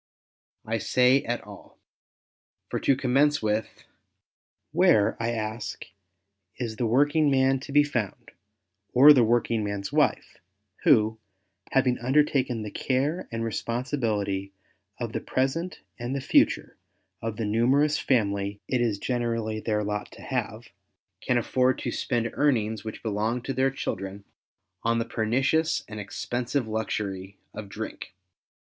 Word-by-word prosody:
I 115 Hz, +1 st, -1 dB
say, 125 Hz, +5 st, +3 dB
at 120 Hz, +1 st, -2 dB
all. 100 Hz, -1 st, -13 dB, 0.9 s
For -, -, -2 dB
to 135 Hz, -, +3 dB
commence 140 Hz, +3 st, +2 dB
with 110 Hz, +1 st, -2 dB, 0.4 s
— -, -, -60 dB
where, 105 Hz, -1 st, +5 dB
I 115 Hz, -, 0 dB
ask, 110 Hz, 0 st, -4 dB, 0.7 s
is 115 Hz, -3 st, -4 dB
the 120 Hz, -, 0 dB
working 145 Hz, +5 st, +3 dB
man 135 Hz, 0 st, +3 dB
to 140 Hz, -, -9 dB
be 145 Hz, +1 st, +6 dB
found, 120 Hz, -9 st, -4 dB, 0.6 s
or 140 Hz, +4 st, +9 dB
the 130 Hz, -4 st, +5 dB
working 115 Hz, -1 st, +1 dB
man's 100 Hz, +3 st, -4 dB
wife, 145 Hz, -7 st, +1 dB, 0.5 s
who, 110 Hz, -3 st, +4 dB, 0.5 s
having 130 Hz, -2 st, +2 dB
undertaken 130 Hz, -3 st, +1 dB
the 105 Hz, -, -6 dB
care 140 Hz, +7 st, -1 dB
and 115 Hz, 0 st, -3 dB
respon 115 Hz, +2 st, -2 dB
sibility 105 Hz, -8 st, -1 dB, 0.5 s
(>f -, -, -3 dB
the -, -, -2 dB
present 150 Hz, +7 st, -2 dB, 0.2 s
and 120 Hz, +3 st, -3 dB
the -, -, -1 dB
future -, -, +2 dB, 0.4 s
of 115 Hz, -1 st, -4 dB
the 115 Hz, -, -2 dB
numerous 135 Hz, +8 st, +2 dB
family 100 Hz, -5 st, 0 dB
it 125 Hz, -2 st, 0 dB
is 115 Hz, -4 st, +1 dB
generally 115 Hz, -2 st, -2 dB
their 105 Hz, -1 st, -1 dB
lot 105 Hz, 0 st, -3 dB
to -, -, -13 dB
have, -, -, -4 dB, 0.5 s
can 125 Hz, -, +1 dB
afibrd 130 Hz, +2 st, +2 dB
to -, -, -2 dB
spend 120 Hz, -3 st, -1 dB
earnings 110 Hz, -7 st, +1 dB
which 110 Hz, -1 st, -7 dB
belong 110 Hz, +2 st, -1 dB
to 135 Hz, -, -3 dB
their 130 Hz, +1 st, +2 dB
children, 100 Hz, -6 st, -5 dB, 0.6 s
on 115 Hz, 0 st, +1 dB
the 115 Hz, -, 0 dB
pernicious 125 Hz, +2 st, +1 dB
and 105 Hz, 0 st, -7 dB
expensive 120 Hz, +5 st, -3 dB
luxury 100 Hz, -3 st, -3 dB, 0.2 s
of 105 Hz, -2 st, -8 dB
drink? 105 Hz, -2 st, -7 dB
115 Hz, 140 wpm, -26 LUFS, 110-130 Hz, 0.9 s, or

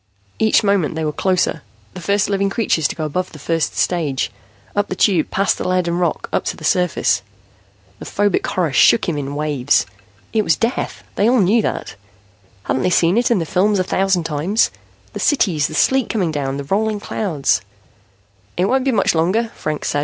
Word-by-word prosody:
Each 220 Hz, 0 st, +3 dB
moment 200 Hz, -7 st, +1 dB
they 160 Hz, 0 st, -2 dB
were 150 Hz, -, 0 dB
closer, 180 Hz, -2 st, 0 dB, 0.3 s
the 180 Hz, -, -8 dB
first 200 Hz, +3 st, +1 dB
living 200 Hz, 0 st, 0 dB
creatures 195 Hz, -, +1 dB
to -, -, -6 dB
go 155 Hz, -, -3 dB
above 180 Hz, +5 st, -3 dB
the -, -, -9 dB
first 165 Hz, +1 st, -2 dB
stage, 155 Hz, -7 st, 0 dB, 0.4 s
up 205 Hz, 0 st, +1 dB
the 185 Hz, -, -3 dB
Tube 180 Hz, -4 st, +2 dB
past 195 Hz, +1 st, 0 dB
the -, -, -2 dB
lead 185 Hz, -1 st, +1 dB
and 170 Hz, +1 st, -1 dB
rock, 175 Hz, -2 st, -1 dB
up -, -, +1 dB
to -, -, -3 dB
the -, -, -12 dB
surface. 180 Hz, +2 st, +1 dB, 0.8 s
The -, -, -8 dB
phobic 205 Hz, -2 st, 0 dB
horror 170 Hz, -6 st, -1 dB
shook 220 Hz, -, +5 dB
him 170 Hz, -, -1 dB
in 140 Hz, -1 st, -4 dB
waves. 145 Hz, -4 st, +1 dB, 0.5 s
It 220 Hz, -, +3 dB
was 165 Hz, -6 st, +2 dB
death; 230 Hz, +2 st, -2 dB
they 210 Hz, -, +3 dB
all 250 Hz, 0 st, +3 dB
knew 210 Hz, +4 st, +3 dB
that. -, -, -3 dB, 0.7 s
Hadn't 130 Hz, -, -1 dB
they -, -, +1 dB
seen 175 Hz, 0 st, +3 dB
it 240 Hz, +1 st, +2 dB
in 235 Hz, -, +3 dB
the 165 Hz, -, -1 dB
films 200 Hz, +6 st, +2 dB
a 185 Hz, -, +2 dB
thousand 190 Hz, -1 st, +1 dB
times? 165 Hz, +8 st, 0 dB, 0.4 s
The -, -, -5 dB
cities, 170 Hz, -, +2 dB
the 155 Hz, -, -7 dB
sleet 265 Hz, +8 st, +2 dB
coming 190 Hz, -8 st, 0 dB
down, 140 Hz, -2 st, -2 dB
the 140 Hz, -, -4 dB
rolling 210 Hz, +7 st, 0 dB
clouds 175 Hz, -9 st, -1 dB, 1.0 s
"It 180 Hz, -, +2 dB
won't 260 Hz, +5 st, +1 dB
be 270 Hz, -, +2 dB
much 215 Hz, -5 st, +2 dB
longer," 185 Hz, +8 st, +1 dB
Franks 155 Hz, -1 st, -3 dB
said. 145 Hz, -, 0 dB
180 Hz, 200 wpm, -19 LUFS, 155-205 Hz, 1.0 s, shook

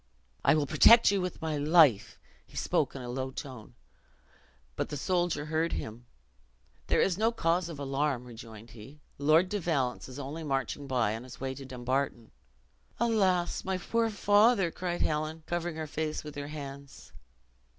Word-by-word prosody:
"I -, -, +5 dB
will 150 Hz, -2 st, +1 dB
protect 230 Hz, -, +7 dB
you 200 Hz, -2 st, +1 dB
with 180 Hz, -2 st, -5 dB
my 155 Hz, -2 st, -1 dB
life." 150 Hz, -, +4 dB, 0.3 s
He -, -, -13 dB
spoke -, -, 0 dB
in 130 Hz, -, -6 dB
a -, -, -7 dB
low 130 Hz, +1 st, -3 dB
tone, 130 Hz, -4 st, -9 dB, 1.0 s
but -, -, -3 dB
he 150 Hz, -, -4 dB
soldier 175 Hz, -1 st, 0 dB
heard 160 Hz, +2 st, -1 dB
him: 115 Hz, +3 st, -6 dB, 0.8 s
"There -, -, +2 dB
is 190 Hz, 0 st, +1 dB
no 225 Hz, +1 st, +3 dB
cause 170 Hz, -5 st, 0 dB
of 165 Hz, -, -7 dB
alarm," 140 Hz, -2 st, -1 dB
rejoined 115 Hz, -1 st, -11 dB
he; 120 Hz, +7 st, -13 dB, 0.2 s
"Lord 155 Hz, +5 st, +4 dB
de 205 Hz, +2 st, -2 dB
Valence 140 Hz, -9 st, -1 dB
is 130 Hz, -, -9 dB
only 145 Hz, +4 st, -6 dB
marching 140 Hz, 0 st, -2 dB
by 120 Hz, -5 st, +1 dB
on 115 Hz, -, -7 dB
his 125 Hz, 0 st, -12 dB
way 130 Hz, 0 st, -3 dB
to 135 Hz, 0 st, -9 dB
Dumbarton." 130 Hz, -1 st, -3 dB, 0.7 s
"Alas, 195 Hz, -7 st, +1 dB
my 190 Hz, 0 st, -1 dB
poor 230 Hz, +5 st, 0 dB
father!" 205 Hz, -2 st, +3 dB
cried 175 Hz, 0 st, -3 dB
Helen, 155 Hz, +1 st, -2 dB
covering 175 Hz, -1 st, -3 dB
her 160 Hz, 0 st, -4 dB
face 155 Hz, 0 st, -3 dB
with 150 Hz, -1 st, -8 dB
her 145 Hz, 0 st, -6 dB
hands. 140 Hz, -2 st, -9 dB
150 Hz, 170 wpm, -30 LUFS, 130-175 Hz, 1.0 s, protect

